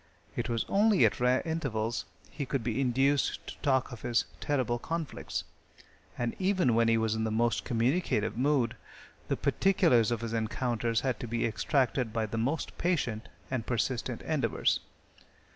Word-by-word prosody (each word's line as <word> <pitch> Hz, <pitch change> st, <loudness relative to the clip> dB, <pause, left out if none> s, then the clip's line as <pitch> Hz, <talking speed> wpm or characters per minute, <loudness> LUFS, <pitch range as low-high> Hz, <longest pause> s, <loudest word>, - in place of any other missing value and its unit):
It -, -, -2 dB
was 115 Hz, -1 st, 0 dB
only 205 Hz, -, +4 dB
at 105 Hz, -, +1 dB
rare 125 Hz, +1 st, +3 dB
intervals 120 Hz, -9 st, -2 dB, 0.3 s
he 145 Hz, -, -4 dB
could 135 Hz, -2 st, -2 dB
be 120 Hz, +3 st, -1 dB
induced 135 Hz, +2 st, +1 dB
to -, -, -7 dB
talk 130 Hz, -2 st, +1 dB
of 120 Hz, -, -8 dB
his 120 Hz, -1 st, +1 dB
terrible 130 Hz, -4 st, 0 dB
conflicts, 165 Hz, +2 st, -4 dB, 0.7 s
and 120 Hz, -1 st, -2 dB
even 185 Hz, -9 st, +2 dB
when 115 Hz, 0 st, +3 dB
he 115 Hz, 0 st, +4 dB
was 110 Hz, -1 st, +1 dB
in 110 Hz, 0 st, -1 dB
the 110 Hz, -, 0 dB
most 115 Hz, +1 st, +1 dB
communicative 120 Hz, -, +1 dB
mood, 125 Hz, -2 st, +1 dB, 0.5 s
the -, -, 0 dB
particulars 170 Hz, -, +3 dB
of 120 Hz, -2 st, -1 dB
his 115 Hz, -1 st, -4 dB
encounters 115 Hz, 0 st, 0 dB
had 130 Hz, -5 st, -1 dB
to 120 Hz, -, -5 dB
be 115 Hz, +1 st, 0 dB
extracted 125 Hz, +1 st, +1 dB
by 110 Hz, 0 st, 0 dB
the 110 Hz, +1 st, -3 dB
most 140 Hz, +8 st, -1 dB
patient 125 Hz, -11 st, -1 dB, 0.2 s
and 125 Hz, -4 st, -2 dB
persistent 120 Hz, +1 st, -1 dB
endeavors. -, -, +1 dB
120 Hz, 160 wpm, -30 LUFS, 115-140 Hz, 0.7 s, only